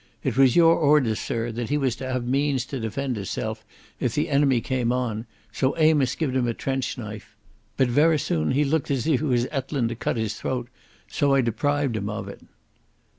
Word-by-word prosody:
It - - -1
was 130 -2 +5
your 165 -1 +6
orders, 145 -8 +3
sirr, 115 0 -2
that 115 0 -4
he 145 - +1
was 130 -5 0
to 130 0 -5
have 130 -1 -2
means 135 0 0
to 135 0 -5
defend 125 +3 -3
hisself 100 -2 -4 0.4
if 120 -2 -1
the 150 +3 0
enemy 140 -3 +3
cam 120 0 -1
on, 120 -3 -2 0.2
so 130 +6 0
Amos 155 -5 +3
gie'd 140 -6 -2
him 125 -2 +1
a 115 - -1
trench 135 -1 -2
knife. 110 -3 -8 0.4
But 130 - +3
verra 155 +6 +4
soon 80 - 0
he 145 +3 +3
looked 150 +1 0
as 135 -4 0
if 155 -6 +2
he 155 - -2
was 120 -2 +2
ettlin' 135 -3 -1
to 115 - -4
cut 115 - -2
his 110 -2 -1
throat, 125 +1 -4 0.4
so 140 -2 +1
I 135 - +4
deprived 135 +2 0
him 105 -1 -3
of 105 -2 -5
it." 100 - -10
130 Hz, 210 wpm, -24 LUFS, 115-145 Hz, 0.4 s, your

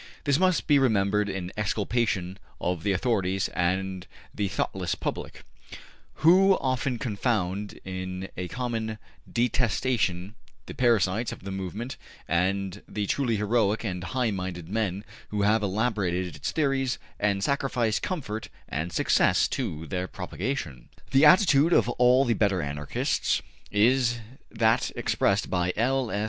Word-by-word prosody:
This 140 0 +2
must 185 -2 +2
be 145 -2 +5
remembered 105 -4 +2
in 95 -2 -4
exculpation 105 -3 -1 0.2
of 90 -2 -1
the 100 - 0
authorities 95 -2 0
and 95 +1 -1 0.3
the 105 -1 -1
thoughtless - - -2
public, - - -5 0.8
who 190 +3 +6
often 130 -1 -1
confound 105 -3 -2
in 95 0 -5
a 90 0 -4
common 115 -2 -3 0.3
detestation 115 -5 0 0.3
the - - -8
parasites 115 -2 +2
of - - -9
the 95 - -5
movement 95 +6 -5 0.3
and 95 +3 0
the 105 -1 -3
truly 120 +1 0
heroic 105 0 +1
and 90 -4 -3
high 125 -2 0
minded 90 -3 -5
men 100 -2 -2 0.2
who 105 -1 -1
have 105 +2 +3
elaborated 100 -4 -1
its - - -3
theories 135 -4 0 0.2
and 100 -1 +1
sacrificed 125 -5 0
comfort 120 - -4 0.2
and 80 +4 -3
success - - +3
to 80 +1 -3
their 90 +4 -3
propagation. 95 - -5 0.2
The 135 +3 +6
attitude 165 -2 +6
of - - +4
all 125 +2 +4
the 120 - +2
better 100 -4 +1
Anarchists 75 0 -1 0.3
is 120 +3 +3 0.3
that 110 0 +2
expressed - - +1
by 90 0 +1
L. 130 +2 +1
105 Hz, 130 wpm, -27 LUFS, 95-125 Hz, 0.8 s, who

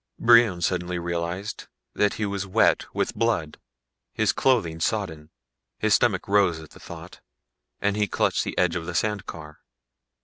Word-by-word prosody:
Brion 115 -6 +5
suddenly 90 0 -1
realized 85 +3 -4 0.3
that 105 -1 +1
he 110 - -2
was 100 -1 -3
wet 95 - +2
with - - -1
blood, 85 -10 -1 0.5
his - - +1
clothing 105 -12 +1
sodden. 80 -6 -2 0.5
His 110 -1 +1
stomach 105 -5 +2
rose 100 -5 +3
at 80 -1 -13
the - - -15
thought - - -11 0.6
and 100 0 0
he 105 -1 +1
clutched - - 0
the - - -5
edge 90 -2 +2
of 85 -1 -4
the 90 - -5
sand 105 +2 -1
car. 75 -2 -9
95 Hz, 160 wpm, -25 LUFS, 85-105 Hz, 0.6 s, Brion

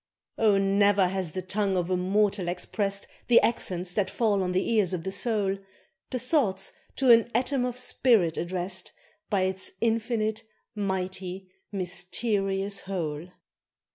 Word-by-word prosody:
Oh! 215 -3 +4
ne'er 195 -1 +3
has 185 -4 -3
the 185 - -4
tongue 195 +1 0
of 180 0 -1
a - - +3
mortal 195 +1 +1
expressed 195 +3 -2 0.2
The 240 - +7
accents 180 -6 0
that 205 -1 0
fall 210 -4 +1
on 180 -1 -1
the 185 +1 0
ears 195 -5 +2
of 165 - -6
the 190 - -3
soul, 200 -2 +1 0.5
The 255 - -2
thoughts 240 - +1 0.2
to 265 -2 +4
an 230 0 +6
atom 255 +1 +1
of 250 -1 -3
spirit 225 -9 +2
addressed 180 +2 -3 0.4
By 200 -2 +1
its 190 0 -1
infinite, 220 -1 0 0.3
mighty, 190 -2 -4 0.2
mysterious 195 +1 -1
whole. 170 -4 -4
195 Hz, 140 wpm, -27 LUFS, 185-215 Hz, 0.5 s, The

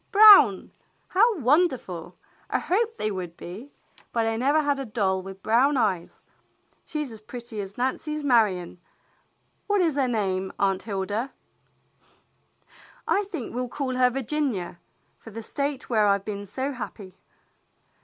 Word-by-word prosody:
Brown! 410 - +8 0.4
How 435 +3 +3
wonderful! 255 - 0 0.3
I - - +1
hoped 450 +4 0
they 215 - -1
would 180 -3 -6
be, 205 +11 -9 0.4
but 230 -1 0
I 225 0 0
never 285 +6 +2
had 285 -1 0
a - - -2
doll 195 -4 0
with 195 0 -10
brown 260 +6 +3
eyes. 190 -8 -1 0.7
She's 300 -4 -4
as 220 -1 -10
pretty 235 -1 -7
as 195 0 -9
Nancy's 300 +4 -2
Marion. 210 -10 +2 0.9
What 410 -1 +2
is 325 -6 +1
her 270 -2 +2
name, 190 -5 -1
Aunt 195 -1 +1
Hilda?" 205 +4 -3 1.8
"I 405 +1 +2
think 330 - -6
we'll 250 0 -3
call 260 -1 -3
her 250 0 +4
Virginia, 255 - -2 0.4
for - - -12
the 225 +1 -8
State 280 +2 -3
where 215 -3 +3
I've 200 -1 +2
been 205 -1 -5
so 265 +8 -3
happy." 210 -6 -8
235 Hz, 145 wpm, -25 LUFS, 200-285 Hz, 1.8 s, Brown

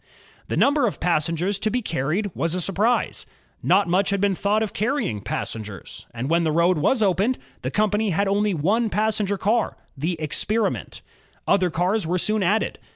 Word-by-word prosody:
The - - -2
number 285 -2 +3
of 205 - -4
passengers 170 +3 0
to 215 - 0
be 245 +2 -1
carried 170 +6 -1
was 165 +1 -1
a - - -1
surprise. 200 +7 0 0.2
' - - -37
Not 190 +2 +3
much 185 +3 +2
had 200 0 0
been 200 0 +2
thought 205 +4 +1
of 215 - -4
carrying 220 - -1
passengers, 105 -2 -5
and 120 +2 -4
when 170 +2 +2
the 160 - +1
road 170 +1 +3
was 225 - +2
opened 200 +6 +2 0.2
the - - -2
company 210 0 +1
had 195 +3 +1
only 200 0 +1
one 215 +9 +1
passenger 210 -2 0
car, 220 +4 0 0.2
the 160 +4 -2
Experiment, 205 +8 -1 0.4
Other 185 -2 +3
cars 180 +3 0
were 180 +2 +1
soon 215 +4 0
added. 200 +4 0
195 Hz, 180 wpm, -23 LUFS, 170-215 Hz, 0.4 s, number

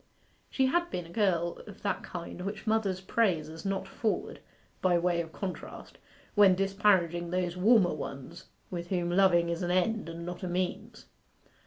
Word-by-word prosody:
She 265 - +2
had 345 +6 +1
been 180 - -4
a 165 - -13
girl 175 -5 +1
of 205 0 -12
that 200 - -1
kind 175 0 -7
which 200 +4 -5
mothers 215 -4 +1
praise 185 -6 +1
as 160 +1 -9
not 195 -1 -2
forward, 220 -2 -2 0.4
by 180 -2 +3
way 170 0 +1
of 165 -1 -8
contrast, 185 +1 -7 0.3
when 200 -3 +6
disparaging 190 -3 +2
those 180 -1 -1
warmer 195 0 +4
ones 145 +2 -7 0.3
with 175 -1 -4
whom 175 -2 -1
loving 175 -2 +4
is 170 +1 -2
an 175 - -1
end 185 +1 +1
and 165 0 -7
not 175 0 -6
a 185 - -3
means. 180 +1 -3
180 Hz, 170 wpm, -30 LUFS, 170-200 Hz, 0.4 s, when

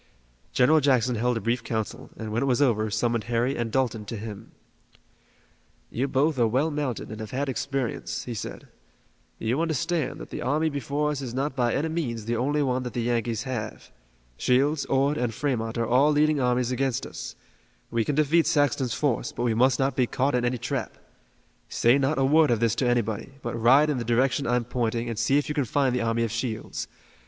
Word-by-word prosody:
General 155 +5 +4
Jackson 130 -4 +2
held 120 +1 0
a - - -4
brief 115 +1 -1
council, 110 -2 -4
and, 110 -1 -5
when 115 - 0
it 140 - +1
was 125 -1 +2
over, 110 -6 +2
summoned 115 +1 0
Harry 120 +3 0
and 115 -1 -2
Dalton 120 -4 0
to 115 - -5
him. 105 -1 -8 1.4
"You 125 - -1
are - - -2
both 140 +1 +1
well 130 +7 +2
mounted 145 -8 -3
and 110 - -7
have 110 -1 -6
had 140 +4 -2
experience," 135 -1 -3
he 120 - -5
said. 110 - -7 0.7
"You 120 +7 -1
understand 165 -1 -1
that - - -10
the - - -5
army 150 +5 +1
before 145 +2 -1
us 140 -2 -3
is 125 -3 -5
not 135 +1 -1
by 120 -3 +1
any 150 +4 0
means 120 -10 -3
the 120 +1 -1
only 145 +5 +1
one 130 -1 0
that 125 -3 -5
the 120 - -1
Yankees 115 -1 -1
have. 120 -6 -5 0.5
Shields, 140 +3 +2
Ord 140 +2 +1
and 120 -3 -1
Fremont 120 -5 -2
are 115 - +1
all 130 +6 +4
leading 150 0 +3
armies 125 -1 +1
against 130 0 -1
us. - - -7 0.6
We 115 -1 +1
can 145 - -1
defeat 155 +2 +3
Saxton's 135 -5 +1
force, 120 -1 0
but 120 - -4
we 120 -2 +2
must 125 +2 +3
not 135 +1 0
be 125 -2 +2
caught 135 +4 0
in 125 -1 +1
any 120 +1 0
trap. 120 0 -4 0.7
Say 120 +4 +3
not 135 +3 +1
a 135 - +3
word 155 +2 +5
of 120 -3 +2
this 115 -1 +2
to 130 - +1
anybody, 120 +1 -1
but 120 - -3
ride 130 +7 +5
in 135 - -1
the - - -2
direction 125 +4 +1
I'm 120 0 +1
pointing 120 -1 -1
and 115 -2 -4
see 135 +4 +3
if 145 - 0
you 150 - -2
can 145 -3 0
find 130 +2 +1
the 125 - 0
army 115 0 +1
of 115 - -2
Shields. 115 -1 -4
125 Hz, 210 wpm, -26 LUFS, 115-140 Hz, 1.4 s, word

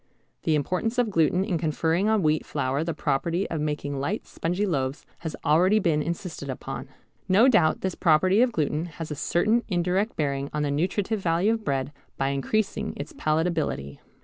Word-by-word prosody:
The 160 - +3
importance 185 - -1
of 240 -4 +2
gluten 165 +1 +3
in 180 -6 -1
conferring 165 +5 +1
on 220 -4 +2
wheat 155 0 +2
flour 140 0 -1
the 165 -2 -3
property 170 +7 0
of 160 -2 -1
making 145 -2 -2
light 180 +11 -2
spongy 180 +5 -2
loaves 135 -6 -2
has 160 -2 -5
already 180 +8 +4
been 165 -7 +2
insisted 165 -3 -5
upon. 130 - -5 0.4
No 205 +7 +6
doubt 210 -11 +3
this 190 -1 -1
property 185 +7 +4
of 250 -1 +3
gluten 155 -3 -1
has 160 -2 -5
a - - -2
certain 210 +11 +2
indirect 185 +3 0
bearing 140 -2 -1
on 150 0 0
the 145 - 0
nutritive 190 +8 0
value 180 +4 +2
of 225 -1 -3
bread 135 -2 -1 0.3
by 135 - 0
increasing 195 +10 -1
its 145 +2 -6
palatability. 155 - -1
165 Hz, 175 wpm, -26 LUFS, 150-190 Hz, 0.4 s, No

